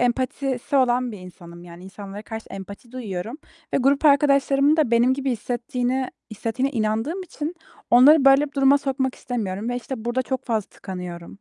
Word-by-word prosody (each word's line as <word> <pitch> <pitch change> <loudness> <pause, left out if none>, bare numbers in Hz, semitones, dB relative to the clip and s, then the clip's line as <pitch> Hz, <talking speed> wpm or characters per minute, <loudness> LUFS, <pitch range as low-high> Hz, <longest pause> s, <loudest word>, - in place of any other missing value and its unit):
empatisi 255 +2 -1
olan 250 -2 +2
bir 210 - -8
insanım. 175 -1 -12
Yani 175 +1 -12
insanlara 200 +1 -9
karşı 220 0 -7
empati 200 +5 -9
duyuyorum 225 -1 -5 0.4
ve - - +4
grup 275 +3 +2
arkadaşlarımın 280 0 +4
da 300 -7 +2
benim 240 +2 +4
gibi 275 -1 -2
hissettiğini 250 +2 -2 0.2
hissetiğine 250 +6 -2
inandığım 225 - -1
için 320 -2 -5 0.4
onları 270 +5 +7
böyle 275 +2 +6
bir 285 - -13
duruma 275 0 +4
sokmak 265 -2 -1
istemiyorum 215 -3 -4
ve 245 - -1
işte 245 -2 -6
burada 240 +2 0
çok 260 0 -4
fazla 220 -4 -1
tıkanıyorum. 180 -2 -7
245 Hz, 165 wpm, -23 LUFS, 215-275 Hz, 0.4 s, onları